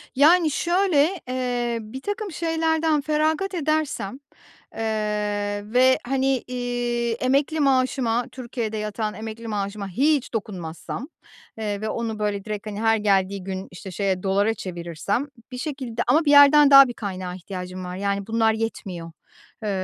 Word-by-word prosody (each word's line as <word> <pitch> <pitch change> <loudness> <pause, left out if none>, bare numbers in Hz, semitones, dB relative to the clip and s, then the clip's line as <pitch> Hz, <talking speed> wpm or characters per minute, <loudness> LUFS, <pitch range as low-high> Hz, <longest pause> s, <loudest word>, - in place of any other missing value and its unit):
Yani, 315 +3 +5
şöyle, 350 0 +2
eee, 245 -2 -1
birtakım 385 - -5
şeylerden 320 -2 +1
feragat 310 +6 0
edersem, 300 - -1 0.6
eee, 210 -2 -1
ve, 260 +1 +5
hani, 270 0 +1
iii, 245 -1 -1
emekli 275 +6 +1
maaşıma, 255 -3 +2
Türkiye'de 235 -3 -4
yatan 215 0 -3
emekli 220 +1 -7
maaşıma 200 -1 -3
hiç 275 - +1
dokunmazsam, 190 - -5 0.5
eee, 210 -2 -3
ve 215 - -2
onu, 225 -2 -3
böyle, 205 -1 -2
direkt, 210 0 -5
hani, 210 +1 -5
her 225 0 +3
geldiği 195 -2 +1
gün, 190 0 -5
işte, 185 +2 -9
şeye, 190 0 -1
dolara 200 +3 +2
çevirirsem 180 - -3 0.2
bir 250 - -6
şekilde 255 -5 -4
ama 305 +7 +4
bir 290 - +4
yerden 285 0 +8
daha 275 -1 +10
bir 245 - -5
kaynağa 185 -4 -5
ihtiyacım 185 0 -7
var. 180 0 -5
Yani, 200 +1 -2
bunlar 225 0 +2
yetmiyor. 190 -7 -4 0.5
Eee, 210 - -1
230 Hz, 140 wpm, -24 LUFS, 205-275 Hz, 0.6 s, daha